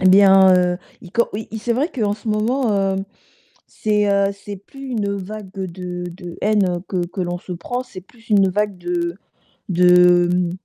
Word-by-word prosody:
Eh 185 - +5
bien, 190 -1 +7
heu, 180 0 +2 0.2
il 180 - -13
co 235 +5 +2
oui, 215 +2 -5
c'est 235 +2 -1
vrai 275 +7 0
qu'en 215 -6 0
ce 215 +1 -9
moment, 225 +4 +1 0.2
heu, - - -2 0.7
c'est, 210 -1 0
heu, 200 0 +2
c'est 200 0 -9
plus 270 +7 -11
une 210 -4 -1
vague 200 +1 -7
de 180 -2 -5
de 175 0 -10
haine 195 -4 +1
que 180 -2 -1
que 185 +2 -6
l'on 175 0 -2
se 180 - -13
prend. 245 +9 -4
C'est 210 -7 -11
plus 225 +5 -22
une 200 -2 +5
vague 205 0 -1
de 175 -1 -2 0.5
de, 180 -1 +5
mmh, 180 -1 +1
195 Hz, 185 wpm, -20 LUFS, 180-210 Hz, 0.7 s, bien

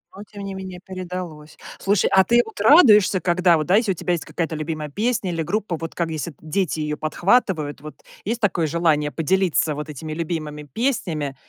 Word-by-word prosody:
Но 200 - -9
тем 205 -1 -10
не 195 0 -5
менее 190 -1 -7
передалось. 180 -5 -7 0.2
Слушай, 200 0 +2
а 190 - +7
ты 240 +4 +4
вот 220 - -11
радуешься, 210 - +6
когда 175 -1 +3
вот, 155 - -3
да, 180 - +4
у - - +7
тебя 180 0 -2
есть 170 - -3
какая-то 165 -2 -3
любимая 155 0 -4
песня 215 - -1
или 165 -1 -2
группа, 205 +1 -2
вот 165 +1 -7
как 170 -2 -1
если 160 0 -4
дети 160 +1 -1
ее 150 0 -2
подхватывают, 155 - 0
вот 150 -1 -11 0.2
есть 230 +4 -2
такое 175 -6 +1
желание 155 -2 +1
поделиться 165 -2 +1
вот 150 +1 -6
этими 155 +2 -6
любимыми 155 -2 -4
песнями, 155 - -2
170 Hz, 190 wpm, -22 LUFS, 155-195 Hz, 0.2 s, а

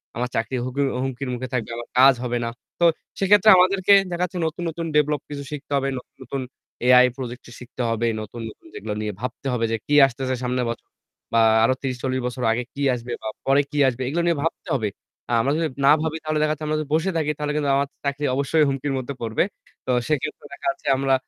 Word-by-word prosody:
আমার 125 +1 -2
চাকরি 115 +3 -1
হুমকির 140 +2 0 0.2
হুমকির 135 0 -4
মুখে 125 +1 -4
থাকবে, 115 -3 -1
আমার 120 - -7
কাজ 135 +1 +8
হবে 120 0 -1
না। - - -1 0.3
তো 175 - +4 0.3
সেক্ষেত্রে 205 +2 +5
আমাদেরকে 190 +2 +4 0.2
দেখা 175 +1 -1
যাচ্ছে 180 0 -7
নতুন, 165 +2 -5
নতুন 165 +1 -5
ডেভেলপ 150 -1 +2
কিছু 140 -1 -5
শিখতে 145 -1 -7
হবে, 135 0 0
নতুন, 125 - -11
নতুন 135 +2 -4 0.5
এআই 125 0 +8
প্রজেক্ট 125 -1 -6
শিখতে 125 0 -8
হবে, 115 +1 0
নতুন, 110 +2 -8
নতুন - - -16
যেগুলো 105 0 -5
নিয়ে 105 -1 -3
ভাবতে 125 +2 -5
হবে 115 -1 +1
যে 115 - +1
কি 145 - +2
আসতেছে 130 0 -3
সামনের 125 0 0
বছর 115 - -6 0.5
বা 115 - +5 0.2
আরো 130 +3 +4
৩০-৪০ 130 0 -2
বছর 125 0 -5
আগে 120 +2 0
কি 145 - -6
আসবে 120 0 -5
বা - - -5 0.2
পরে 135 +1 +4
কি 150 - -4
আসবে 130 0 -1
এগুলো 165 +6 0
নিয়ে 170 -3 +2
ভাবতে 165 - -3
হবে। 110 -6 0 0.4
আ - - -3
আমরা 135 +4 +1
যদি 165 -1 +1 0.2
না 140 - +8
ভাবি 160 0 -2
তাহলে 155 0 -1
দেখা 155 0 +2
যাচ্ছে 155 0 -6
আমরা 155 0 0
যদি 155 - -4
বসে 175 +4 +1
থাকি 150 -1 +1
তাহলে 150 0 -2
কিন্তু 145 -2 0
আমার 140 0 +1 0.2
চাকরি 140 +1 -1
অবশ্যই 145 +3 +2
হুমকির 135 +1 -2
মধ্যে 130 +2 -4
পড়বে। 115 +4 +1 0.4
তো - - 0 0.2
সেক্ষেত্রে 155 0 -2
দেখা - - -6
যাচ্ছে 170 - -12
আমরা 135 0 +1
135 Hz, 220 wpm, -23 LUFS, 125-150 Hz, 0.5 s, কাজ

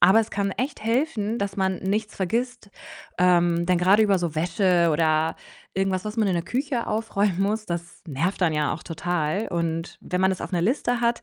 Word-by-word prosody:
aber 190 +5 +7
es 220 - -4
kann 200 0 -1
echt 260 -2 -4
helfen, 230 -2 0
dass 200 -1 -3
man 190 -1 +1
nichts 210 +3 -2
vergisst. 235 +3 -2 0.5
Ähm, 175 -1 +3
denn 180 -1 +3
grade 195 +5 +5
über 200 -3 +3
so 170 -3 -3
Wäsche 175 +1 +2
oder 160 0 +1 0.4
irgendwas, 190 0 0
was 210 +2 -5
man 215 -2 +2
in 185 - +1
der 170 - 0
Küche 255 - -2
aufräumen 205 -4 0
muss, 215 +2 0
das 170 0 -6
nervt 165 +8 -1
dann 170 -3 +3
ja 150 -1 0
auch 155 - -10
total 175 +3 -2
und 165 -1 -2
wenn 180 0 -3
man 190 - +4
das 185 - -3
auf - - -6
'ner 175 - +1
Liste 245 +2 0
hat 235 0 +1
190 Hz, 205 wpm, -24 LUFS, 170-215 Hz, 0.5 s, aber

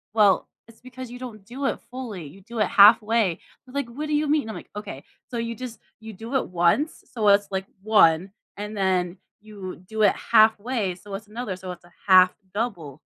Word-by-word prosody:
"Well, 205 -3 +4 0.2
it's 230 -1 -19
because 255 0 -9
you 245 - -9
don't 220 -6 -9
do 260 +5 -5
it - - -2
fully, 235 -10 -6
you 185 +8 -14
do 235 +4 -10
it 210 - +4
halfway." 210 -2 +5 0.3
They're, 250 - -15
like, 280 -3 -1
"What 290 +6 -6
do 300 - 0
you 300 +1 +1
mean?" 290 -5 +1
I'm, 220 - -5
like, - - -11
"Okay. 210 -10 -7 0.3
So 240 - -4
you 230 0 -2
just 250 -1 -8 0.2
you 220 0 -9
do 225 +6 -9
it - - -2
once 180 - +1
so, 220 -4 0
it's, 200 0 +4
like 190 0 -3 0.2
1, 190 -4 +4 0.3
and 210 +1 -6
then 185 -2 0 0.3
you 200 -4 -8
do 220 -1 -1
it 200 - +5
halfway, 220 -3 +2
so, 200 +2 -12
it's 210 +2 -8
another 215 -2 -5
so, 185 0 -9
it's 175 -1 -11
a 175 - -20 0.2
1/2 185 -1 +7 0.2
double." 175 - -4
215 Hz, 210 wpm, -24 LUFS, 190-235 Hz, 0.3 s, 1/2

